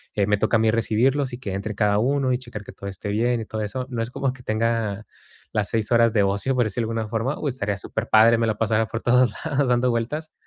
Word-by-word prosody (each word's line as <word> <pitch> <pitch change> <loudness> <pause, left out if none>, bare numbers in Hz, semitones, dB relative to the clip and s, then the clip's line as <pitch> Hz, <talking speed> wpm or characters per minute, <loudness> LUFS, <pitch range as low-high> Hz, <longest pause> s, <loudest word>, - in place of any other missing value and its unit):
eh, 100 - +2
me 105 0 +2
toca 115 - +1
a - - 0
mí 110 -1 +3
recibirlos 125 +4 +1
y 120 - -4
que 100 -7 -5
entre 100 +2 -4
cada 105 0 +2
uno 135 +2 +1
y 125 - +2
checar 120 -5 -9
que - - -10
todo 100 - -8
esté 100 +2 -6
bien 115 +3 +1
y - - -6
todo 110 0 -5
eso. 125 +5 -3
No 120 -3 -3
es 115 - -3
como 135 0 -1
que 125 - -13
tenga 110 -2 -1 0.5
las 105 -2 0
6 110 -1 -1
horas 115 -1 +4
de 105 -3 +3
ocio, 100 +7 0
por 125 - +3
decirlo 110 +2 -2
de - - -4
alguna 110 - -5
forma. 115 +6 -1
Uy, 145 - -1
estaría 105 -5 -2
superpadre, 110 +4 +3
me 115 - +1
la 110 -1 -1
pasara 110 0 +1
por 115 +3 -5
todos 125 -2 +3
lados 145 -3 +1
dando 125 +1 +2
vueltas. 125 +7 -2
115 Hz, 265 wpm, -23 LUFS, 105-125 Hz, 0.5 s, horas